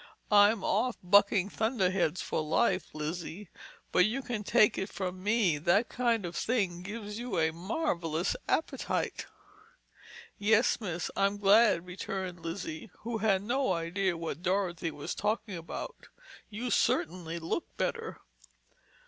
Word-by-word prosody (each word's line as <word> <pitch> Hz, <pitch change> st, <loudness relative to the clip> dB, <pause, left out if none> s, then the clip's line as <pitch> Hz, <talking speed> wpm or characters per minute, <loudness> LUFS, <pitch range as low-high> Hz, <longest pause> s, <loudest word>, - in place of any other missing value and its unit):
"I'm 205 Hz, 0 st, +6 dB
off 235 Hz, +4 st, +1 dB
bucking 200 Hz, +1 st, +4 dB
thunderheads 190 Hz, -, 0 dB
for -, -, -1 dB
life, 185 Hz, +3 st, +1 dB
Lizzie. 165 Hz, +5 st, -5 dB, 0.4 s
But 180 Hz, +2 st, +5 dB
you 255 Hz, +5 st, -2 dB
can 235 Hz, -4 st, -3 dB
take 215 Hz, 0 st, +4 dB
it 190 Hz, -, -3 dB
from 185 Hz, -1 st, -4 dB
me, 205 Hz, -6 st, +2 dB
that 175 Hz, +9 st, +2 dB
kind 235 Hz, -5 st, +1 dB
of 175 Hz, -, -6 dB
thing 195 Hz, -8 st, 0 dB
gives 210 Hz, +2 st, -6 dB
you 240 Hz, -6 st, -3 dB
a 160 Hz, -1 st, +2 dB
marvelous 175 Hz, -, -1 dB
appetite!" 320 Hz, -, -1 dB, 1.1 s
"Yes, 220 Hz, +4 st, +3 dB
miss, 175 Hz, -4 st, -3 dB
I'm 200 Hz, +1 st, +1 dB
glad," 205 Hz, -3 st, +5 dB
returned 180 Hz, 0 st, -5 dB
Lizzie, 165 Hz, +3 st, -5 dB
who 230 Hz, 0 st, -3 dB
had 200 Hz, -3 st, +2 dB
no 245 Hz, -1 st, +1 dB
idea 175 Hz, +2 st, -1 dB
what 165 Hz, -1 st, -5 dB
Dorothy 180 Hz, -2 st, 0 dB
was 150 Hz, -2 st, -5 dB
talking 210 Hz, -1 st, -2 dB
about. 170 Hz, -, -7 dB, 0.4 s
"You 235 Hz, +3 st, -4 dB
certainly 175 Hz, -8 st, +1 dB
look 165 Hz, -, -3 dB
better." 455 Hz, -1 st, -2 dB
195 Hz, 130 wpm, -30 LUFS, 175-220 Hz, 1.1 s, I'm